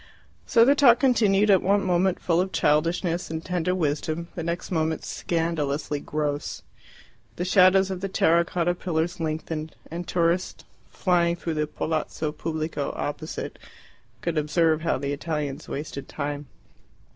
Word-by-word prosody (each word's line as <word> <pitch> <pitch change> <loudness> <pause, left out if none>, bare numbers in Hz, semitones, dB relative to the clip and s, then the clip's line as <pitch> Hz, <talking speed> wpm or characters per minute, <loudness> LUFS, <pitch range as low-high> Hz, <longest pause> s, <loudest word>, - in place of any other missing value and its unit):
So 230 -3 +6
their 275 - +6
talk 255 -5 +6
continued, 215 -6 +4
at 190 - +5
one 200 +2 +2
moment 185 0 +2
full 170 0 +2
of 190 +1 -2
childishness 170 +3 +1
and 160 0 -5
tender 180 0 0
wisdom, 160 +1 -2
the 170 - -5
next 170 +3 -3
moment 160 -2 0
scandalously 155 -3 -2
gross. 150 -1 -3 0.7
The 180 - -2
shadows 190 0 +5
of 185 -1 -4
the 195 - -2
terra 170 -2 +3
cotta 175 0 0
pillars 175 0 -2
lengthened, 160 0 -3 0.2
and 170 +1 -5
tourists, 175 +1 0 0.3
flying 170 -2 +1
through 170 -1 -4
the 150 -1 -1
Palazzo 155 0 -2
Pubblico 155 -2 -3
opposite, 150 +2 -5 0.6
could 165 -2 0
observe 155 +1 +2
how 165 - +1
the 140 +1 -2
Italians 145 -2 -4
wasted 140 -1 -5
time. 145 -1 -4
165 Hz, 145 wpm, -25 LUFS, 155-180 Hz, 0.7 s, So